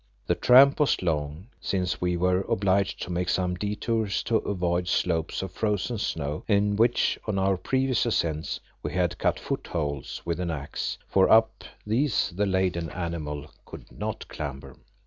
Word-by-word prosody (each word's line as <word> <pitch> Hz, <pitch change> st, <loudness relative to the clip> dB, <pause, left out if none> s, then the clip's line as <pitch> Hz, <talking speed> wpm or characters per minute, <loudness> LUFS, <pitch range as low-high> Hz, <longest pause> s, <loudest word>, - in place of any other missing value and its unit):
The -, -, +2 dB
tramp 135 Hz, +4 st, +6 dB
was 145 Hz, -9 st, +2 dB
long 75 Hz, 0 st, -2 dB
since 90 Hz, -3 st, -2 dB
we 90 Hz, 0 st, +1 dB
were 90 Hz, +1 st, +2 dB
obliged 100 Hz, 0 st, +1 dB
to 90 Hz, -, -6 dB
make 90 Hz, +1 st, -1 dB
some 90 Hz, -1 st, +1 dB
detours 105 Hz, +2 st, -1 dB
to 115 Hz, -, +2 dB
avoid 90 Hz, -4 st, -1 dB
slopes 85 Hz, 0 st, 0 dB
of 95 Hz, -, -5 dB
frozen 105 Hz, +1 st, -1 dB
snow 75 Hz, -6 st, -3 dB
in 100 Hz, -1 st, +2 dB
which, 115 Hz, +3 st, +2 dB
on 105 Hz, -2 st, -1 dB
our 95 Hz, 0 st, +2 dB
previous 130 Hz, +4 st, 0 dB
ascents, 80 Hz, -8 st, -1 dB, 0.2 s
we -, -, -4 dB
had 90 Hz, -1 st, 0 dB
cut -, -, +1 dB
footholds 75 Hz, -5 st, -4 dB
with 85 Hz, 0 st, -2 dB
an 90 Hz, -1 st, -2 dB
axe, 75 Hz, -3 st, -4 dB
for 95 Hz, -1 st, +3 dB
up 110 Hz, 0 st, +4 dB, 0.2 s
these 125 Hz, +4 st, +1 dB
the 100 Hz, +2 st, +1 dB
laden 95 Hz, -3 st, 0 dB
animal 80 Hz, -4 st, -5 dB
could -, -, -12 dB
not -, -, -5 dB
clamber. 70 Hz, -3 st, -7 dB
90 Hz, 160 wpm, -26 LUFS, 85-105 Hz, 0.2 s, tramp